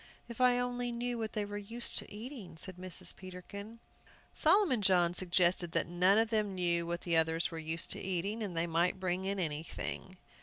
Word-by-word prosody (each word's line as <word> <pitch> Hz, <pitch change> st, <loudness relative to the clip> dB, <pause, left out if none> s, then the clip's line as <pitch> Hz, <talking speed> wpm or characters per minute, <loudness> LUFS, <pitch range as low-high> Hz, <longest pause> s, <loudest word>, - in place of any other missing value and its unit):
"If 235 Hz, +1 st, -6 dB
I 250 Hz, -1 st, +5 dB
only 245 Hz, 0 st, -1 dB
knew 240 Hz, 0 st, -2 dB
what 220 Hz, -1 st, -3 dB
they 210 Hz, -1 st, -1 dB
were 205 Hz, 0 st, -5 dB
used 230 Hz, +4 st, -3 dB
to -, -, -11 dB
eating," 220 Hz, -, -8 dB
said 185 Hz, +2 st, -3 dB
Mrs. 185 Hz, 0 st, -3 dB
Peterkin. 200 Hz, +4 st, -9 dB, 0.6 s
Solomon 325 Hz, -, +3 dB
John 180 Hz, -3 st, +4 dB
suggested 175 Hz, -1 st, +2 dB
that -, -, +2 dB
none 180 Hz, +4 st, +3 dB
of 225 Hz, 0 st, +2 dB
them 210 Hz, -3 st, +1 dB
knew 170 Hz, -2 st, +2 dB
what 170 Hz, 0 st, -3 dB
the 170 Hz, -2 st, 0 dB
others 160 Hz, +1 st, +2 dB
were 165 Hz, -, -5 dB
used 160 Hz, +1 st, -1 dB
to -, -, 0 dB
eating, 190 Hz, +4 st, -2 dB
and 190 Hz, -6 st, -4 dB
they 165 Hz, -, +2 dB
might 175 Hz, +3 st, +1 dB
bring 185 Hz, 0 st, -1 dB
in 200 Hz, +1 st, -1 dB
anything. 165 Hz, +3 st, -3 dB
185 Hz, 195 wpm, -33 LUFS, 175-220 Hz, 0.6 s, I